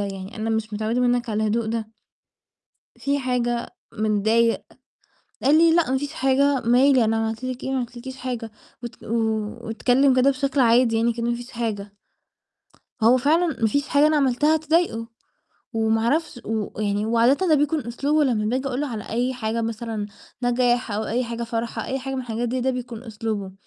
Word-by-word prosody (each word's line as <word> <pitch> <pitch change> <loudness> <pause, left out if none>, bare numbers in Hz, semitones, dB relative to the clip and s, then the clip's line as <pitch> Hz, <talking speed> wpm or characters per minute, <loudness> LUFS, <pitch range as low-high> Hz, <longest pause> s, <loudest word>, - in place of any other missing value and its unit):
يعني 195 +1 -5
أنا 220 +1 -2
مش 220 -1 -2
متعوّدة 220 +3 -1
مِنّك 245 -1 +1
على 215 0 0
الهدوء 220 +1 0
ده." 220 -1 -3 1.1
"في 280 +4 -1
حاجة؟ 240 -2 -1 0.2
متضايق؟" 220 +2 +1 0.8
قال 295 +3 +5
لي: 330 0 +5
"لأ 335 -6 +2
ما 265 - +2
فيش 290 +2 -5
حاجة، 275 -1 +2
مالي! 250 +2 +4
أنا 225 +1 +1
عملت 225 +2 -2
لِك 255 -1 -4
إيه؟ 265 - -2
ما 270 - 0
عملت 245 -1 -4
لكيش 260 +2 -8
حاجة" 245 -3 -5 0.3
وات 240 - -9
واتكلّم 225 +4 +1
كده 255 +2 +5
بشكل 275 +1 -1
عادي 235 -1 +4
يعني 230 +1 +2
كإن 235 0 -4
ما 235 0 +1
فيش 240 +1 -8
حاجة. 215 -4 -4 1.1
هو 235 +3 +6
فعلًا 310 +7 +3
ما 225 - +3
فيش 285 +6 0
حاجة 290 +1 +4
أنا 310 - +3
عملتها 290 +3 +3
تضايقه، 315 -7 0 0.7
وما 225 -1 +1
أعرفش 275 +1 0
و 215 -1 -3
يعني 205 0 0
وعادةً 235 +10 +3
ده 315 - +5
بيكون 295 -1 +1
أسلوبه 285 +6 +1
لمّا 230 -6 +1
باجي 255 +5 -1
أقُول 255 +1 -2
له 295 - -1
على 220 -4 -6
أي 250 +3 -1
حاجة 230 -1 -2
مثلًا 225 -2 -3 0.4
نجاح 245 -1 +1
أو 215 +2 -1
أي 245 +3 -1
حاجة 235 0 -5
فرحة، 230 0 -3
أي 265 - -2
حاجة 270 +1 -5
من 265 - -2
الحاجات 240 -1 -3
دي 255 +2 -1
ده 260 +2 +1
بيكون 245 -2 -6
أسلوبه، 215 -4 -4
240 Hz, 185 wpm, -23 LUFS, 225-265 Hz, 1.1 s, هو